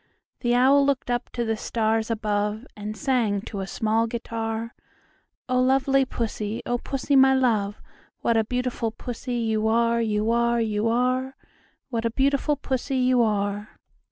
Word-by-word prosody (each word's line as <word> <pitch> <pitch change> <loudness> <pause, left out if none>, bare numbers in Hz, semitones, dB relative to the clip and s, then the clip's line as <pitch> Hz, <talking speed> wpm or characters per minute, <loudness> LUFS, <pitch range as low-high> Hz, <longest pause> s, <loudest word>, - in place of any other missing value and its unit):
The 240 -1 +1
Owl 270 +3 +5
looked 275 -3 0
up 240 - -2
to 240 - -1
the 225 0 0
stars 220 0 -1
above, 210 0 -1
And 210 +1 -6
sang 240 -8 +1
to 205 -1 -6
a 190 - -4
small 225 +2 0
guitar, 225 0 -4 0.7
"O 255 -1 +2
lovely 270 +1 +3
Pussy, 220 -3 -3
O 245 0 -1
Pussy, 275 +2 -1
my 265 0 +6
love, 215 -6 +1 0.4
What 235 - +2
a 225 - +3
beautiful 245 0 -2
Pussy 245 +2 -6
you 220 -2 0
are, 235 +1 +2
You 215 0 0
are, 235 0 +2
You 215 -1 0
are! 255 +3 0 0.6
What 230 -1 -2
a - - +2
beautiful 280 +4 +1
Pussy 265 -1 -2
you 255 -1 +3
are!" 205 -1 -1
235 Hz, 155 wpm, -25 LUFS, 220-255 Hz, 0.7 s, my